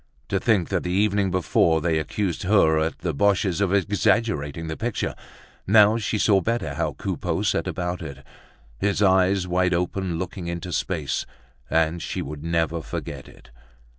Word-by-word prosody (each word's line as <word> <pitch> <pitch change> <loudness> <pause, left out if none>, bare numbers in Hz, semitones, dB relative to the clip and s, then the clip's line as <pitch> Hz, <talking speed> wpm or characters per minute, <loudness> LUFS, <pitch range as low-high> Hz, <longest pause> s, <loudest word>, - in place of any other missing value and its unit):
To 100 - +1
think 100 -5 +2
that 95 -2 0
the 90 - -4
evening 100 +1 +2
before 85 -2 +2
they 80 0 +1
accused 90 +3 -2
her 90 -5 +4
at 80 +1 -1
the 85 -2 -1
Boches' 95 +2 +1
of 100 -3 +2
exaggerating 100 -5 +1
the 80 0 -4
picture! 115 +4 -2 0.5
Now 105 +2 +6
she 110 0 -1
saw 100 -2 +3
better 115 +5 -1
how - - -2
Coupeau - - -3
set - - 0
about 90 0 -3
it, 70 -4 -8 0.5
his 105 0 +1
eyes 95 0 +3
wide 90 0 +2
open 90 0 -2
looking 90 0 -5
into 85 +1 -4
space, 80 -6 -2 0.4
and 80 +1 +1
she - - -3
would 75 +1 -7
never 85 0 0
forget - - -6
it. - - -17
90 Hz, 165 wpm, -24 LUFS, 80-100 Hz, 0.5 s, Now